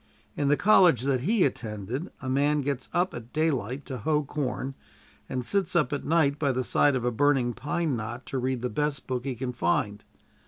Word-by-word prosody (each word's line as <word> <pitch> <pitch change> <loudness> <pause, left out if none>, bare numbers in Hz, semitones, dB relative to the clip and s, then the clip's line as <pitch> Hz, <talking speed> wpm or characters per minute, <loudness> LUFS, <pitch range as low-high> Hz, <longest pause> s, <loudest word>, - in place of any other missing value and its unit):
In 145 - 0
the 145 +1 +4
college 180 - +5
that 135 -1 +1
he 195 - +2
attended 120 - -4
a - - -4
man 145 +3 +2
gets 140 -2 -3
up 180 +2 +1
at 120 0 -8
daylight 140 -5 -1
to 130 -2 -5
hoe 150 -1 +1
corn, 135 -1 -3 0.6
and 125 -1 -3
sits 190 0 0
up 155 -3 +2
at 145 - -2
night 150 -3 +2
by 140 -3 +2
the 130 0 -1
side 145 +2 +3
of 125 -1 -1
a 125 - +2
burning 130 0 +2
pine 150 +3 -1
knot 120 +3 -5
to 135 - -3
read 130 -1 -2
the 125 - 0
best 150 -1 -1
book 125 0 -3
he 135 -2 -2
can 125 +1 -4
find. 105 0 0
135 Hz, 205 wpm, -27 LUFS, 125-150 Hz, 0.6 s, college